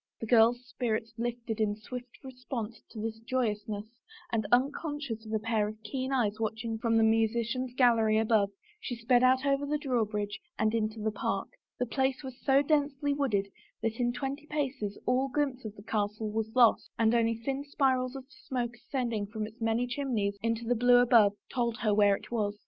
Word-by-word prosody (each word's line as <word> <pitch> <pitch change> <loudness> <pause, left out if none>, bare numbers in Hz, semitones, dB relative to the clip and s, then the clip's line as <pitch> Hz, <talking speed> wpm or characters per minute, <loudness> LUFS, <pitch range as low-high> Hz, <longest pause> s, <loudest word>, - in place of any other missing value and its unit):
The - - -4
girl's 240 +2 +4
spirits 225 -1 -2
lifted 235 -1 -3
in 205 -1 +1
swift 245 +4 -9
response 250 -4 -6
to 220 -1 -5
its 225 0 -4
joyousness 215 -4 -2 0.5
and 220 -2 0
unconscious 270 -3 0
of - - -7
a 220 - +2
pair 220 -1 0
of 215 0 -7
keen 260 +5 -3
eyes 220 -5 +1
watching 225 +1 -2
from 225 -1 +2
the 225 - +5
musician's 230 +3 +1
gallery 230 -4 +4
above 220 -2 +3 0.3
she 260 - -4
sped 240 +1 +3
out 260 +1 +4
over 275 0 +2
the 295 +1 0
drawbridge 215 -7 -1 0.2
and 220 0 +1
into 220 -1 -1
the 215 +1 -1
park. 210 - -2 0.3
The 250 - 0
place 265 +2 0
was 260 -1 -9
so 275 +1 +4
densely 285 -1 +1
wooded 215 -9 0 0.3
that 225 +1 -1
in 240 -1 +2
twenty 275 +4 -4
paces 270 -9 -2
all 255 +2 +2
glimpse 265 -3 -1
of 215 -1 -6
the 205 - -12
castle 210 0 -2
was 220 0 -3
lost 240 -3 +5
and 225 0 +3
only 230 -1 +2
thin 270 +5 -3
spirals 260 -2 +1
of 265 -1 -7
smoke 245 -4 -4
ascending 235 -5 -2
from 215 0 -4
its 220 +2 -12
many 225 +2 +1
chimneys 245 -6 -1
into 230 0 -1
the 240 - +2
blue 245 +1 +5
above 235 -4 +6 0.2
told 235 -2 0
her 215 -2 +1
where 205 -1 +5
it - - -11
was. 210 -3 -1
230 Hz, 190 wpm, -30 LUFS, 220-255 Hz, 0.5 s, above